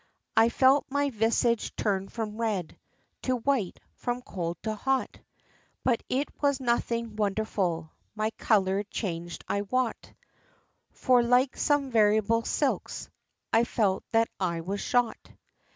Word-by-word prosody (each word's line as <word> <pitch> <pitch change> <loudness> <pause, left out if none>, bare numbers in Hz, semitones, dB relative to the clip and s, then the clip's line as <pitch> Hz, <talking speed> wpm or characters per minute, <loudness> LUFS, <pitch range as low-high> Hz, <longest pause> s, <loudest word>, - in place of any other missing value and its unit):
VII. 225 - +7
I - - +2
felt 265 +3 +4
my 285 +1 0
visage 230 0 +1
turn 195 -2 0
from 220 -1 -4
red 200 -7 -1 0.5
To 255 - 0
white 245 -5 0
from 245 0 -3
cold 175 -5 -4
to 220 0 -1
hot; 265 +5 -1 0.6
But 240 -3 +2
it 275 +3 0
was 280 -2 +2
nothing 235 -3 -1
wonderful 195 -6 -1 0.2
My 215 +1 0
color 195 -3 +2
changed, 175 -5 -5
I 200 - 0
wot, 245 +3 -2 0.8
For, 250 -1 +3
like 250 +2 +3
some 290 -2 +1
variable 220 0 +3
silks, - - -1 0.4
I 225 - +5
felt 205 -5 0
that 225 0 +3
I 170 -3 -1
was 195 +4 -3
shot. 245 -2 0
225 Hz, 135 wpm, -28 LUFS, 200-250 Hz, 0.8 s, VII